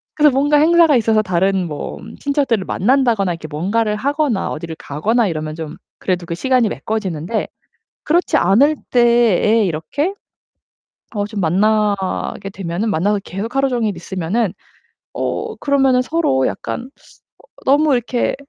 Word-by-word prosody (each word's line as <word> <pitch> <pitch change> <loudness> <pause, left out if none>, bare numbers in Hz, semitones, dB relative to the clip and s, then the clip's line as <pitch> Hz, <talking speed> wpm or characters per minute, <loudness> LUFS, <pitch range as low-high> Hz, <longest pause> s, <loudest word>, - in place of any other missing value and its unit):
그래서 300 -1 +5
뭔가 290 +3 +3
행사가 325 -1 +5
있어서 220 -1 +2
다른 185 -1 0
뭐 150 -2 -6 0.2
친척들을 275 -8 0
만난다거나 230 -4 +2
이렇게 165 -2 -8
뭔가를 205 +8 -1
하거나 280 -2 0
어디를 160 +1 -6
가거나 215 +11 0
이러면 155 -1 -4
좀 160 -2 -7 0.2
그래도 180 -2 -1
그 170 0 -4
시간이 255 +1 +2
메꿔지는데 205 -3 -3 0.6
그렇지 345 +4 +2
않을 265 - +4
때에 235 -3 +4
이렇게 190 - -2 1.0
어 205 - 0
좀 210 -1 -4
만나게 200 +2 0
되면은 190 +3 -3
만나서 205 +3 +1
계속 210 +7 -6
하루종일 245 -7 +1
있으면은 185 +4 -2 0.6
어 - - -3
그러면은 270 -3 +2
서로 255 - +1
약간 245 +2 -5 0.5
어 - - -20 0.2
너무 285 +1 +4
이렇게 245 +1 0
215 Hz, 325 characters per minute, -18 LUFS, 180-260 Hz, 1.0 s, 그래서